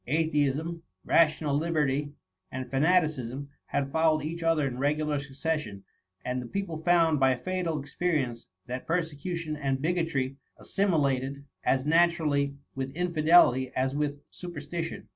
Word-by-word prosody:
Atheism, 155 +2 0 0.2
rational 155 -3 +3
liberty, 150 -2 0 0.4
and 130 0 -4
fa 135 - +1
naticism, 145 -5 +1 0.2
had 140 -1 -1
followed 160 -1 +2
each 165 +3 -4
other 165 -3 +2
in 125 -1 -5
regular 150 +1 +1
succession; 140 -7 -3 0.4
and 125 0 -1
the 125 - -7
people 170 -1 -4
found, 165 -3 +4
by 130 -1 +4
fatal 175 +2 -2
ex 140 0 -11
perience, 135 -10 -1 0.2
that 125 +1 -6
persecution 165 -1 -2
and 135 -3 -1
bigotry 155 -5 -1 0.2
assimi 195 -4 +1 0.2
lated 140 +2 -6 0.2
as 130 +1 +1
naturally 155 -4 +2 0.2
with 135 0 -4
inlBdelity 160 -6 +4
as 130 +1 +1
with 145 -1 -2
super 175 -4 -7
stition. 165 +3 -5
150 Hz, 140 wpm, -28 LUFS, 135-165 Hz, 0.4 s, found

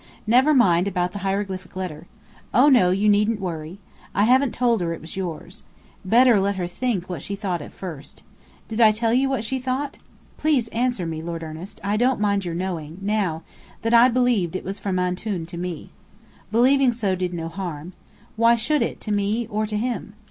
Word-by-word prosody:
"Never 255 +7 +4
mind 180 -7 +4
about 180 -2 -1
the 200 - -6
hieroglyphic 195 -1 -3
letter. 175 -3 -5 0.5
Oh, 260 +6 +6
no, 240 -10 +5
you 195 +3 +1
needn't 210 +1 +3
worry! 165 -2 -5 0.4
I 200 - +3
haven't 255 +3 +4
told 235 -4 +2
her 170 -1 -1
it - - -8
was 160 - -8
yours. 180 -5 -6 0.4
Better 235 +2 +5
let 200 +1 0
her 180 -2 -2
think 185 +1 -2
what 175 -6 -5
she 200 - -4
thought 190 -5 -3
at - - -9
first. 165 -7 -9 0.4
Did 220 0 -5
she 215 -2 +5
tell 230 -1 +2
you 265 +2 +3
what 265 -5 -1
she 260 +4 -2
thought? 260 +3 -3 0.4
Please 275 -7 +1
answer 240 -5 -1
me, 160 -1 -4
Lord 165 0 -5
Ernest! 160 +5 -8
I 205 +1 0
don't 250 +1 +2
mind 200 -2 +1
your 170 -1 -3
knowing 170 -3 -4
now 195 -5 -1 0.4
that 225 +1 +1
I 235 +2 +7
believed 235 -8 +1
it - - -3
was 195 +2 -5
from 190 -2 -2
Antoun 180 0 -2
to 170 +2 -9
me. 175 -3 -5 0.6
Believing 255 +3 +4
so, 210 -5 -1
did 185 -1 -2
no 165 -2 -4
harm. 170 -1 -6 0.4
Why 230 +1 +5
should 290 +6 0
it, - - -2
to 210 - -3
me, 205 +3 0
or 215 +1 -1
to 210 0 -2
him? 225 -2 -3
200 Hz, 200 wpm, -23 LUFS, 180-235 Hz, 0.6 s, I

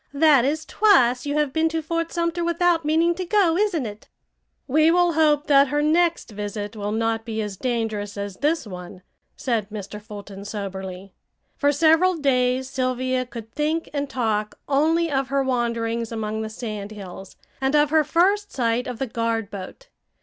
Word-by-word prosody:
"That 285 -4 +5
is 305 +3 -1
twice 260 - +3
you 290 - -1
have 295 -3 +1
been 320 0 +2
to 320 0 -2
Fort 335 +1 -2
Sumter 340 0 -1
without 340 0 +2
meaning 325 +3 +2
to 370 +2 -4
go, 365 -3 +3
isn't 365 - +1
it?" 210 0 -9 0.6
"We 310 +4 +4
will 350 0 +3
hope 300 -2 +3
that 280 -2 +5
her 295 +2 0
next 335 -2 +2
visit 205 +1 -5
will 205 -1 -3
not 225 0 0
be 220 -1 -4
as 205 -2 -5
dangerous 220 -3 -2
as 200 -2 -5
this 300 0 0
one," 180 -2 -9 0.3
said 225 -5 -1
Mr. 210 0 -7
Fulton 205 -2 -9
soberly. 195 -2 -6 0.4
For 285 -1 +2
several 325 +5 +4
days 255 -3 +1
Sylvia 255 -1 -1
could 230 -3 -9
think 310 +4 -1
and 285 -1 -2
talk 215 -5 -1
only 320 +4 +2
of 270 -1 0
her 275 0 +1
wanderings 235 -2 -1
among 220 -1 -3
the 220 - -4
sand 215 -3 -6
hills, 195 -2 -9 0.3
and 265 +2 +1
of 295 0 +3
her 315 -1 +4
first 385 +7 +2
sight 240 0 0
of 250 - -5
the 270 - -2
guard 230 -3 -2
boat. 205 - -9
255 Hz, 175 wpm, -23 LUFS, 220-315 Hz, 0.6 s, That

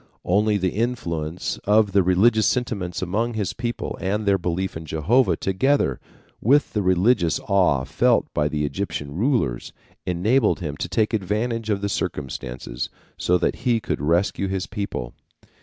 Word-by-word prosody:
Only 105 +3 +2
the 95 -2 0
influence 85 -8 -2
of 105 0 +4
the 100 0 +4
religious 105 +4 +4
sentiments 100 -9 -1
among 110 +6 -1
his 105 -4 -2
people 120 0 -4
and 105 +4 -1
their 100 -1 +3
belief 90 +2 -2
in 80 - -6
Jehovah 80 - +2
together 95 - +1 0.4
with 140 +6 +3
the 105 - +1
religious 95 -1 +2
awe 90 -10 +2
felt 115 - +2
by 75 -1 +1
the 75 0 -1
Egyptian 75 -3 -4
rulers, 100 - 0 0.3
enabled 105 +8 +2
him 75 -5 -4
to - - -4
take 110 0 +1
advantage 110 +3 -1
of 100 -2 0
the 100 - 0
circumstances 60 -8 -4 0.3
so 90 - +2
that - - 0
he 120 -2 +1
could 105 - -3
rescue 85 +5 +1
his 95 0 -2
people. 100 - -5
100 Hz, 155 wpm, -23 LUFS, 85-110 Hz, 0.4 s, of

